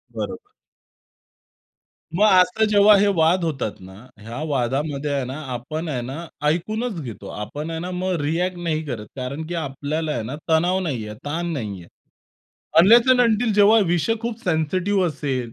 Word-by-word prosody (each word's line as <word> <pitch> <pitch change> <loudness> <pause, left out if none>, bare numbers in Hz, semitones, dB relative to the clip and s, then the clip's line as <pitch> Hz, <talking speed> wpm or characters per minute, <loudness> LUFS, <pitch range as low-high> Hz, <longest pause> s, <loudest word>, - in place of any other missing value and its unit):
बरोबर. 410 - -5 1.7
मग 210 - +5
असं 185 +4 +4
जेव्हा 205 0 +6
हे 205 +1 +3
वाद 170 +2 +3
होतात 135 -9 -2
ना, 95 0 -12 0.3
ह्या 115 +6 -7
वादामध्ये 140 +2 -1
आहे 135 -2 -1
ना 130 - -5 0.2
आपण 155 +7 -5
आहे 130 -5 -2
ना 135 +8 -6 0.2
ऐकूनच 215 +6 -1
घेतो. 120 -6 -8
आपण 145 +10 -6
आहे 165 - -3
ना 180 +2 -5
मग 185 +1 -2
रिअ‍ॅक्ट 175 +5 -1
नाही 165 -2 -2
करत 115 -7 -5
कारण 140 +4 -5
की 175 - -5
आपल्याला 150 +1 -3
आहे 120 -6 -2
ना 125 +6 -5
तणाव 175 +4 +3
नाहीये, 120 - -3
ताण 170 +4 -2
नाहीये. 100 - -5 0.9
अनलेस 230 +8 +7
अँड 255 - +5
अंटील 225 -1 +2
जेव्हा 210 +2 +6
विषय 175 +6 +1
खूप 230 -1 -3
सेन्सिटिव्ह 185 +4 +1
असेल, 135 -7 -3
160 Hz, 160 wpm, -22 LUFS, 135-185 Hz, 1.7 s, अनलेस